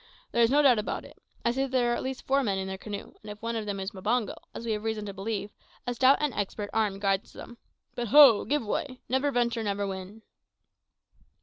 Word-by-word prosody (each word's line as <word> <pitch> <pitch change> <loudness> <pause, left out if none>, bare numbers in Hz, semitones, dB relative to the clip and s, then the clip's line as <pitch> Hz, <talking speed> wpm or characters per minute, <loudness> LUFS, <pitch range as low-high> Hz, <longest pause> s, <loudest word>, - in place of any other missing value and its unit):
There 235 - +2
is 230 - +5
no 290 +3 +4
doubt 250 -5 +6
about 210 - -3
it. - - -16 0.2
I 235 - +4
see 265 +3 -1
that 270 - -1
there 245 -2 +2
are - - +1
at - - -3
least 260 -1 -5
four 275 +1 +3
men 200 -7 0
in 190 0 -3
their 190 - -4
canoe, 205 -1 -7
and 215 - -10
if 210 0 -8
one 230 +1 -3
of 220 -2 -3
them 200 -1 -3
is 190 +2 -4
Mbango, 215 +3 -1 0.2
as 235 - -8
we 230 - -1
have 210 -1 -2
reason 220 -1 -2
to 200 - -6
believe, 205 +1 -4 0.3
a 245 - -1
stout 260 +3 +5
and 295 -4 0
expert 205 0 -3
arm 215 -3 +1
guides 195 0 -1
them. 240 -1 -11 0.3
But 240 -1 -3
ho! 265 -3 +8
give 290 -4 0
way! 255 +4 -3
`never 270 +2 +2
venture, 235 -2 0
never 200 -1 -1
win.'" 195 +3 -7
225 Hz, 240 wpm, -28 LUFS, 205-250 Hz, 0.3 s, ho